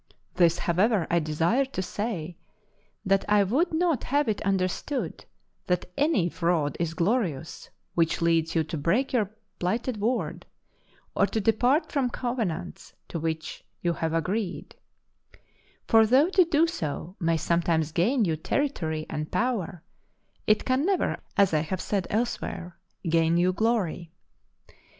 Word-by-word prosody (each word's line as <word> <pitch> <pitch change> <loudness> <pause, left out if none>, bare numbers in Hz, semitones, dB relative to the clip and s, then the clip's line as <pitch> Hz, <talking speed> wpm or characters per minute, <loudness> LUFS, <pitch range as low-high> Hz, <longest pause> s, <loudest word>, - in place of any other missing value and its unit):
This, 170 -1 +3
however, 185 +2 +2
I 170 - +4
desire 165 - +1
to 265 -8 -4
say, 180 -5 -4 0.7
that 195 0 +3
I 205 -1 +5
would 275 - +1
not 325 -5 +1
have 285 +2 +1
it 215 -2 -1
understood 195 - -2 0.4
that 180 -1 0
any 280 - +2
fraud 165 -5 0
is 165 -1 -2
glorious 170 - -1 0.2
which 165 -1 +1
leads 165 -1 +1
you 165 - +3
to 160 +1 -5
break 220 - +1
your 215 -6 +2 0.3
plighted 225 +6 -1
word, 230 +5 -2 0.7
or 200 - +3
to 220 - -2
depart 245 - +2
from 270 -4 +1
covenants 220 -9 -4
to 165 - -4
which 160 0 -4 0.2
you 170 -1 +2
have 165 -1 -2
agreed; 180 +3 -2 1.1
for 225 -1 +6
though 270 +8 +5
to 375 -2 +4
do 325 -1 +3
so 175 - -4
may 165 -2 +1
sometimes 165 -1 +1
gain 220 - +2
you 165 -3 0
territory 160 - -2
and 150 0 -4
power, 200 -8 -1 0.6
it 215 0 +3
can 260 +2 +2
never, 380 +1 +1 0.2
as 195 -4 +4
I 155 - +4
have 160 +4 -3
said 195 -2 -1
elsewhere, 195 -6 -3 0.3
gain 165 0 +3
you 180 +1 +3
glory. 185 -6 0
185 Hz, 140 wpm, -27 LUFS, 165-240 Hz, 1.1 s, for